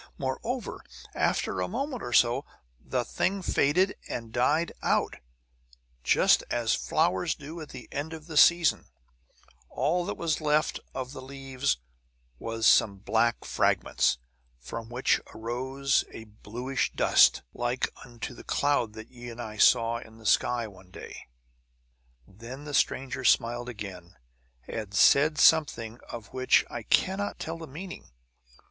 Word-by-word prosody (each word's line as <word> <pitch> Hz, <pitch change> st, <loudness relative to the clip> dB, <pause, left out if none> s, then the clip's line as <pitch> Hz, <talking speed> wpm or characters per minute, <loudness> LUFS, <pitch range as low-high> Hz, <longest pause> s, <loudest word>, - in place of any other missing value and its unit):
Moreover, 220 Hz, -, -4 dB, 0.3 s
after -, -, 0 dB
a -, -, -1 dB
moment 275 Hz, -3 st, -3 dB
or 120 Hz, -, -5 dB
so, 120 Hz, 0 st, +4 dB, 0.4 s
the -, -, -1 dB
thing 195 Hz, 0 st, -1 dB
faded 180 Hz, +8 st, +2 dB
and 115 Hz, -2 st, -5 dB
died 150 Hz, +7 st, +2 dB
out, -, -, +1 dB, 0.9 s
just -, -, +4 dB
as 120 Hz, -1 st, +1 dB
flowers 95 Hz, +1 st, +1 dB
do 155 Hz, +3 st, -9 dB
at 155 Hz, -, -9 dB
the 130 Hz, -2 st, -10 dB
end 145 Hz, +3 st, -4 dB
of 160 Hz, -1 st, -8 dB
the 160 Hz, -1 st, -8 dB
season; 170 Hz, +2 st, +5 dB, 0.8 s
all 165 Hz, +7 st, 0 dB
that 205 Hz, -, -4 dB
was 165 Hz, -2 st, -1 dB
left 150 Hz, 0 st, +1 dB, 0.2 s
of 130 Hz, -1 st, -4 dB
the 130 Hz, -, -8 dB
leaves 135 Hz, -, -2 dB, 0.6 s
was 115 Hz, 0 st, -3 dB
some 100 Hz, -2 st, +5 dB
black 115 Hz, +4 st, 0 dB
fragments, -, -, +1 dB, 0.4 s
from 115 Hz, -, -7 dB
which 125 Hz, +2 st, +1 dB
arose 130 Hz, +5 st, 0 dB
a 110 Hz, -, -9 dB
bluish 120 Hz, +5 st, -3 dB
dust, -, -, +5 dB
like 120 Hz, +1 st, -1 dB, 0.2 s
unto 120 Hz, 0 st, -7 dB
the -, -, -12 dB
cloud 140 Hz, -7 st, +1 dB
that 110 Hz, +1 st, -10 dB
ye 120 Hz, -1 st, -9 dB
and 120 Hz, 0 st, -10 dB
I 110 Hz, -2 st, -6 dB
saw 115 Hz, +2 st, +4 dB
in 110 Hz, -2 st, -14 dB
the 110 Hz, -, -16 dB
sky 120 Hz, +1 st, +2 dB
one 95 Hz, -3 st, -16 dB
day. -, -, -10 dB, 1.0 s
"Then 115 Hz, +8 st, -10 dB
the 145 Hz, -1 st, -7 dB
stranger 135 Hz, -1 st, 0 dB
smiled 120 Hz, 0 st, +2 dB
again, 95 Hz, -6 st, -8 dB, 0.5 s
and 105 Hz, -2 st, -5 dB
said 145 Hz, +8 st, +5 dB
something 130 Hz, -8 st, +3 dB
of 115 Hz, -3 st, -8 dB
which 130 Hz, 0 st, +3 dB
I 120 Hz, -, -4 dB
cannot 190 Hz, -, +1 dB
tell 165 Hz, +1 st, -5 dB
the 160 Hz, -, -8 dB
meaning. 180 Hz, +7 st, -9 dB
125 Hz, 140 wpm, -28 LUFS, 115-150 Hz, 1.0 s, season